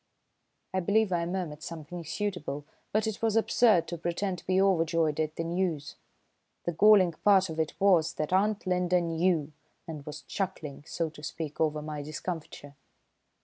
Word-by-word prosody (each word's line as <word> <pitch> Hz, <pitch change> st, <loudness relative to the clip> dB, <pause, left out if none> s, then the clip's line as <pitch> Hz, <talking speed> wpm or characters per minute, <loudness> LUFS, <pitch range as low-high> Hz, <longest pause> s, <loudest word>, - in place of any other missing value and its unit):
I 190 Hz, -, +1 dB
believe 205 Hz, +3 st, +2 dB
I 170 Hz, -1 st, 0 dB
murmured 175 Hz, -5 st, -4 dB
something 170 Hz, +1 st, -7 dB
suitable, 160 Hz, -5 st, -3 dB, 0.3 s
but 215 Hz, +1 st, +1 dB
it 220 Hz, 0 st, -3 dB
was 225 Hz, -1 st, +1 dB
absurd 220 Hz, -5 st, +4 dB
to 170 Hz, -, -5 dB
pretend 175 Hz, +2 st, -2 dB
to -, -, -19 dB
be 185 Hz, 0 st, +3 dB
overjoyed 165 Hz, -5 st, +2 dB
at 155 Hz, 0 st, -1 dB
the 165 Hz, -, -2 dB
news. 165 Hz, -3 st, -2 dB, 0.7 s
The 175 Hz, -, -1 dB
galling 190 Hz, +1 st, +6 dB
part 190 Hz, -4 st, +5 dB
of 160 Hz, -, -5 dB
it 160 Hz, -1 st, -2 dB
was 180 Hz, -5 st, +4 dB
that 155 Hz, +3 st, -2 dB
Aunt 205 Hz, +2 st, +2 dB
Linda 180 Hz, -1 st, +2 dB
knew, 165 Hz, -2 st, +1 dB, 0.4 s
and 155 Hz, -3 st, -6 dB
was 150 Hz, -1 st, -7 dB
chuckling, 165 Hz, -8 st, -4 dB
so 165 Hz, -1 st, -2 dB
to 150 Hz, -, -13 dB
speak, 155 Hz, 0 st, -5 dB
over 155 Hz, -1 st, +1 dB
my 150 Hz, -1 st, -5 dB
discomfiture. 155 Hz, -1 st, -6 dB
170 Hz, 165 wpm, -29 LUFS, 155-190 Hz, 0.7 s, galling